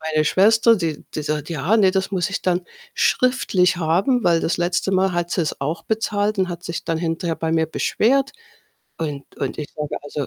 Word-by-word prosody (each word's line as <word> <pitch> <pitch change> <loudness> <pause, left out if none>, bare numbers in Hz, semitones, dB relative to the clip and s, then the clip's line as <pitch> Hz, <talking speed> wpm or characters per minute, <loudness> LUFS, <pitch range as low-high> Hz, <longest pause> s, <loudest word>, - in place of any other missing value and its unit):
Meine 155 -1 0
Schwester, 225 +5 +5
die 160 -5 -3
die 155 - -2
sagt: 150 0 -3
„Ja, 165 +7 +1
ne, 190 -3 +5
das 190 +1 -1
muss 180 -3 0
ich 200 - -4
dann 180 -1 0 0.3
schriftlich 200 -8 +2
haben.“ 190 +10 +1
Weil 170 -1 +4
das 165 - 0
letzte 175 +2 0
Mal 190 0 +2
hat 175 0 -2
sie's 170 -3 -1
auch 155 +4 -2
bezahlt 215 -1 -1
und 185 -1 +1
hat 175 0 -6
sich 170 -2 -5
dann 165 -1 -1
hinterher 165 0 -2
bei 160 0 -2
mir 160 -1 +2
beschwert. 265 - +1 0.7
Und 145 -4 -4
Und 135 - -3
ich 150 - -5
sage: 150 -1 -4
„Also, 145 -1 -4
175 Hz, 200 wpm, -21 LUFS, 160-195 Hz, 0.7 s, Schwester